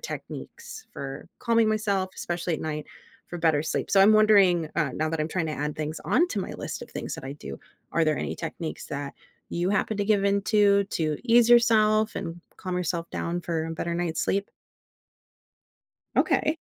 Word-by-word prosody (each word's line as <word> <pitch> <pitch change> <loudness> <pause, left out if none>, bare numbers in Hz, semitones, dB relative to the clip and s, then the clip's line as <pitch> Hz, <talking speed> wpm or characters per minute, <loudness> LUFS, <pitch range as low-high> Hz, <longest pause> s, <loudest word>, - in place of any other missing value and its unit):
techniques - - -8
for - - -7
calming 230 -2 +3
myself- 200 -3 0
especially 175 -1 -2
at - - -5
night- 150 -1 -4 0.4
for 175 - -5
better 160 -3 +2
sleep, - - -2
so 195 - +5
I'm 205 +3 +7
wondering, 195 -7 +5
uh- 150 -6 0
now 155 +1 -1
that 165 -1 -2
I'm 155 - -1
trying 175 -2 -1
to 155 - -3
add 150 +1 -3
things 155 +1 -4
onto 335 - +2
my - - -5
list - - -6
of - - -11
things - - -5
that - - -9
I 135 - -5
do- 145 - -9 0.3
are 165 -1 +3
there 155 -1 +2
any - - -3
techniques 165 -1 -6
that 140 -1 -5 0.3
you 175 +1 -1
happen 210 +1 0
to 205 - +1
give 200 -2 +2
into 200 0 +3
to 155 -5 -2
ease 235 0 +5
yourself 220 -2 +5
and 165 +1 -5 0.2
calm 185 -2 -4
yourself 170 -1 -2
down 170 +1 -2
for 165 -2 -2
a - - -5
better 170 +1 -3
night's 170 -2 -1
sleep? 200 +1 -1 1.7
Okay. 310 +1 +2
175 Hz, 185 wpm, -26 LUFS, 160-210 Hz, 1.7 s, I'm